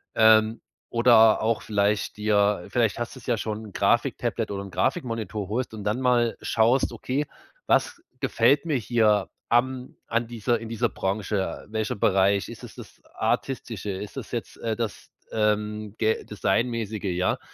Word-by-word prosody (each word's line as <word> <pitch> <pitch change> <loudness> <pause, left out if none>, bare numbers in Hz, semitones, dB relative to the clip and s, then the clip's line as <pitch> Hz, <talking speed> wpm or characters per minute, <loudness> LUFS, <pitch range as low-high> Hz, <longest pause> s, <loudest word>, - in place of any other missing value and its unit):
ähm, 110 0 +5 0.3
oder 115 -2 +5
auch 115 0 +1
vielleicht 105 0 0
dir 105 -3 +2
vielleicht 120 -3 +1
hast 120 - -4
du 130 - -11
ja 120 - +1
schon, 110 +1 -4
'n 100 - -14
Grafik-Tablet - - 0
oder 100 -1 -3
'n 100 - -9
Grafik-Monitor 115 - -2
holst 120 +1 -2
und 105 -1 -7
dann 110 +5 0
mal 120 -2 +2
schaust: 120 +4 +2
„Okay, 130 +5 -2 0.4
was - - +2 0.2
gefällt 135 +7 +3
mir 155 -3 0
hier 110 -4 +2 0.2
am 125 +2 +1
an 115 0 0
dieser 115 0 -1
in 115 -1 -8
dieser 115 - 0
Branche, 95 -2 -2
welcher 110 0 -2
Bereich 100 0 +2
ist - - -10
es - - -13
das - - -12
Artistische? 115 -6 -2
Ist 95 0 -7
das - - -6
jetzt, - - -4
äh, 115 -1 -2
das, 115 -2 -5 0.2
ähm, 105 -1 -1
ge 110 0 0
designmäßige“, 110 +1 -1
ja? 90 - +1
110 Hz, 155 wpm, -25 LUFS, 105-120 Hz, 0.4 s, ähm